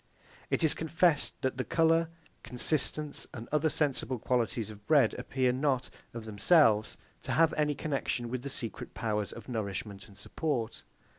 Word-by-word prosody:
It - - 0
is 160 - +5
confessed 160 -1 +1
that 130 -1 0
the 130 - 0
colour, 165 +1 +2 0.3
consistence, 150 +3 0
and 115 -1 -7
other 150 +1 +2
sensible 140 -3 0
qualities 115 -2 -1
of 105 -1 -14
bread 140 -7 +5
appear 130 -2 +1
not, 130 -1 0 0.2
of 115 -1 -7
themselves, 110 - +3 0.2
to - - -3
have 165 0 +4
any 150 -1 +1
connexion 135 -5 -2
with 125 +1 -3
the 140 - -5
secret 115 -4 -6
powers 105 -3 -1
of 115 - -10
nourishment 100 -4 -4
and 100 -2 -16
support. 125 - -3
130 Hz, 155 wpm, -30 LUFS, 115-150 Hz, 0.3 s, is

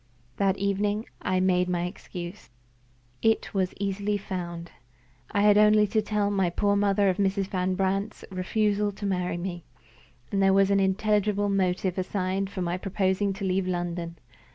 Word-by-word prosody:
That 195 -1 +2
evening 205 +2 0 0.2
I 185 0 0
made 180 -1 +2
my 175 -1 0
excuse. 180 -1 -7 0.7
It 225 0 +1
was 190 -2 0
easily 200 +1 -1
found. 175 -4 -6 0.6
I 205 - +2
had 210 0 +6
only 210 0 +6
to 215 +2 +1
tell 210 -1 0
my 190 -3 +1
poor 200 +3 +1
mother 200 0 +2
of 185 -1 +1
Mrs. 195 -1 +1
Van 185 -1 -1
Brandt's 195 +2 -1
refusal 205 +2 0
to 205 - -7
marry 180 -3 -1
me, 175 -1 -5 0.7
and 195 - +1
there 195 0 +5
was 195 0 +4
an 200 - +4
intelligible 205 +1 +1
motive 185 -1 0
assigned 190 +1 -1
for 190 -2 -4
my 175 +1 -2
proposing 195 +1 0
to 195 +1 -5
leave 185 0 0
London. 175 -1 -3
195 Hz, 160 wpm, -27 LUFS, 185-205 Hz, 0.7 s, had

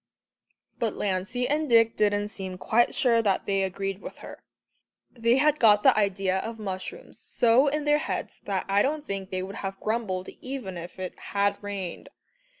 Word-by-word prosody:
But 225 -3 -1
Lancey 205 +6 -1
and 300 0 0
Dick 230 -1 +5
didn't 205 0 +1
seem 190 -3 -6
quite 235 +5 +2
sure 235 -3 +3
that 200 -4 +1
they 195 -1 +1
agreed 195 +1 -3
with - - -8
her. - - -10 0.7
They 235 +1 +2
had 300 +2 +3
got 210 -2 +6
the - - +6
idea 195 -2 +1
of 225 +3 -5
mushrooms 190 -3 -6
so 245 +4 +3
in 300 +1 0
their 295 0 +3
heads - - -4
that 195 -2 -1
I 200 +1 +3
don't 295 +4 -1
think 195 -1 -4
they 185 0 -3
would 195 +2 -7
have 195 0 -5
grumbled 215 -5 -2
even 255 -8 -5
if 175 +2 -8
it 185 -1 -5
had 200 0 0
rained. 200 -4 -6
205 Hz, 175 wpm, -27 LUFS, 190-235 Hz, 0.7 s, got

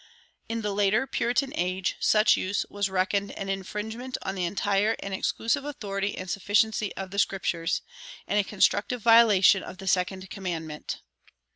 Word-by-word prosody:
In 225 0 -2
the 205 -1 -1
later 205 +5 +2
Puritan 260 +2 0
age 185 +1 -1
such 215 0 +4
use 195 +2 -1
was 200 -1 -1
reckoned 195 +2 0
an 195 - -5
infringement 215 +6 -4
on 190 - -3
the 185 -2 -2
entire 205 +4 +1
and 195 - -5
exclusive 230 +7 0
authority 205 -8 -3
and 185 - -6
sufficiency 205 +2 +1
of 190 -1 -6
the 200 - -2
Scriptures, 175 -4 0 0.4
and 210 - +1
a - - +3
constructive 210 +3 +1
violation 220 -5 +6
of - - -9
the 195 0 -9
second 185 +1 0
commandment. 165 -6 -5
200 Hz, 155 wpm, -27 LUFS, 190-220 Hz, 0.4 s, violation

